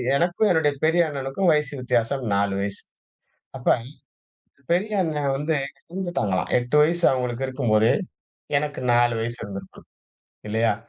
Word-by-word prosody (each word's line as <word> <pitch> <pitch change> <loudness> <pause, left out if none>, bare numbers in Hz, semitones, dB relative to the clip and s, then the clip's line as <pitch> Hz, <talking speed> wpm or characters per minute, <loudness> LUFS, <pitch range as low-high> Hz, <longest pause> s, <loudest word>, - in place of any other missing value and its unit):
எனக்கும் 175 +7 +2
என்னுடைய 155 -4 +2
பெரிய 165 +2 +4
அண்ணனுக்கும் 140 +6 -1
வயசு 150 -1 0
வித்தியாசம் 125 +1 0
4 100 0 +1
வயசு. 100 0 -4 0.8
அப்போ 125 - +3 1.0
பெரிய 205 +5 0
அண்ணன் 150 -4 -1
வந்து 150 +2 0 0.3
இறந்துட்டாங்களாம், 175 - -2
8 125 +4 -1
வயசு 170 +3 +1
அவங்களுக்கு 125 0 -2
இருக்கும்போது 115 -4 +2 0.7
எனக்கு 145 -2 -4
4 120 -1 +3
வயசு 120 +1 -4
இருந்திருக்கும் 100 -1 -10 0.6
இல்லையா? 110 -1 +2
135 Hz, 120 wpm, -24 LUFS, 115-160 Hz, 1.0 s, பெரிய